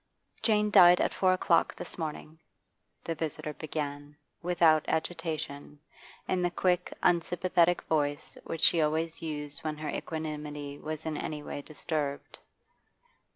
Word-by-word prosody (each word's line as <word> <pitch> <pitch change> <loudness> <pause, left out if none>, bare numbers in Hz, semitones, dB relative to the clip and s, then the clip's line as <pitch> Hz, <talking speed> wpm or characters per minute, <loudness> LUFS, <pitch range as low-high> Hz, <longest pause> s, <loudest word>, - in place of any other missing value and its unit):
'Jane 210 -2 +2
died 180 -3 +8
at - - +1
four 185 -1 +3
o'clock 175 -2 +2
this - - -6
morning,' 160 -1 -6 0.6
the 165 - -2
visitor 155 -1 -4
began, 145 -1 -5 0.2
without 165 -3 +4
agitation, 155 -3 -3 0.5
in 185 - +1
the 175 - +2
quick, 180 0 +1
unsympathetic 175 0 +2
voice 145 -1 -1
which 165 - -5
she 165 - +6
always 160 +2 0
used 150 -3 -5
when 155 -1 -4
her 155 0 -4
equanimity 150 -3 -5
was 155 0 -5
in 155 -2 -2
any 150 -1 -4
way 145 - -5
disturbed. 150 -1 -4
155 Hz, 130 wpm, -30 LUFS, 150-175 Hz, 0.6 s, died